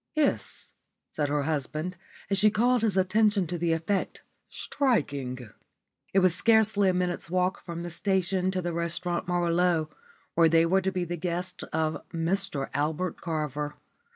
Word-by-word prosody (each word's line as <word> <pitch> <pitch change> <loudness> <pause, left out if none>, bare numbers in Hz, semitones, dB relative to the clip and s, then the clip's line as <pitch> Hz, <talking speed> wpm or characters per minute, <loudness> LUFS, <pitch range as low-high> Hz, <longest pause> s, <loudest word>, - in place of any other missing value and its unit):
"Yes," 305 -2 0 0.4
said 145 -2 -1
her 145 0 +1
husband, 155 +4 -2 0.4
as 195 - +3
she 215 +2 +6
called 240 +3 +2
his 215 -4 +1
attention 205 +1 +3
to 175 +1 -4
the 170 0 +1
effect. 165 +4 -1 0.3
"Striking." 140 - -1 0.6
It 195 - +4
was 185 -2 +4
scarcely 215 -1 +4
a - - +2
minute's 180 -2 -1
walk 185 +1 0
from 170 -1 -6
the 175 - -5
station 185 0 0
to 185 -1 -2
the 175 -1 -2
Restaurant 170 +2 -2
Merveilleux, 175 -2 +1 0.4
where 165 -1 +5
they 165 +1 +5
were 190 +3 +3
to 190 +1 0
be 180 -2 -2
the 175 +1 -4
guests 180 +2 -3
of 160 0 -1
Mr 165 -3 -1
Albert 155 +5 -1
Carver. 150 -3 -3
175 Hz, 155 wpm, -28 LUFS, 160-190 Hz, 0.6 s, she